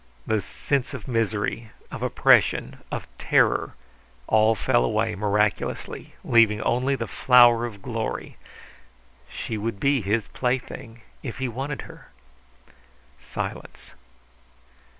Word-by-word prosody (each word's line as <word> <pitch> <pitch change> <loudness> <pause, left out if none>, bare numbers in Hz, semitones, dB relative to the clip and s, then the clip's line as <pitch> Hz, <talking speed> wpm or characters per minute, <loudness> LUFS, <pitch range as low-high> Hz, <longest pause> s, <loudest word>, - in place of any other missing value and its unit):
The 110 -2 +1
sense 140 +7 -2
of 115 - -9
misery, 115 -1 -1 0.2
of - - -7
oppression, 65 - +3
of - - -4
terror, - - +2 0.5
all 110 - +4
fell 120 +4 +2
away 110 0 0
miraculously, 105 +1 -1
leaving 115 -3 +4
only 130 +3 +1
the - - -3
flower 120 -2 +5
of 100 -4 -12
glory. 115 -2 -4 0.9
She 110 - -5
would 110 -1 -3
be 140 +2 +2
his 105 +2 0
plaything 125 -2 -3 0.2
if 125 -5 -6
he 130 -1 -2
wanted 135 +5 -4
her. - - -13 1.2
Silence. - - -7
115 Hz, 110 wpm, -24 LUFS, 105-125 Hz, 1.2 s, flower